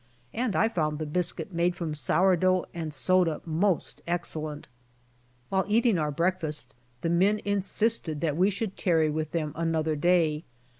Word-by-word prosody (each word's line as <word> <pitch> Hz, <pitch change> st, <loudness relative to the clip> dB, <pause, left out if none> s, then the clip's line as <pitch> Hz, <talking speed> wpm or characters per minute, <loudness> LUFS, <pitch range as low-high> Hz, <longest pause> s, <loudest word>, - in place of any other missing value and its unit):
And 235 Hz, -3 st, -1 dB
I 220 Hz, -, +4 dB
found 155 Hz, -8 st, -1 dB
the 155 Hz, -, -3 dB
biscuit 175 Hz, +2 st, -2 dB
made 175 Hz, +1 st, +1 dB
from 170 Hz, -4 st, -3 dB
sour 180 Hz, +7 st, +3 dB
dough 185 Hz, +1 st, +2 dB
and 160 Hz, -2 st, -4 dB
soda 165 Hz, +2 st, +2 dB
most 170 Hz, +3 st, 0 dB
excellent. 155 Hz, -3 st, -3 dB, 0.8 s
While 190 Hz, 0 st, +1 dB
eating 220 Hz, -2 st, +3 dB
our 150 Hz, -1 st, 0 dB
breakfast 155 Hz, -4 st, -2 dB, 0.3 s
the 165 Hz, -, -1 dB
men 195 Hz, +5 st, +3 dB
insisted 200 Hz, -4 st, 0 dB
that 155 Hz, -3 st, 0 dB
we 185 Hz, +4 st, +3 dB
should 200 Hz, 0 st, -4 dB
tarry 160 Hz, -4 st, +2 dB
with 155 Hz, 0 st, -2 dB
them 155 Hz, -3 st, -2 dB
another 160 Hz, -1 st, 0 dB
day. 160 Hz, -1 st, +2 dB
170 Hz, 155 wpm, -27 LUFS, 155-185 Hz, 0.8 s, I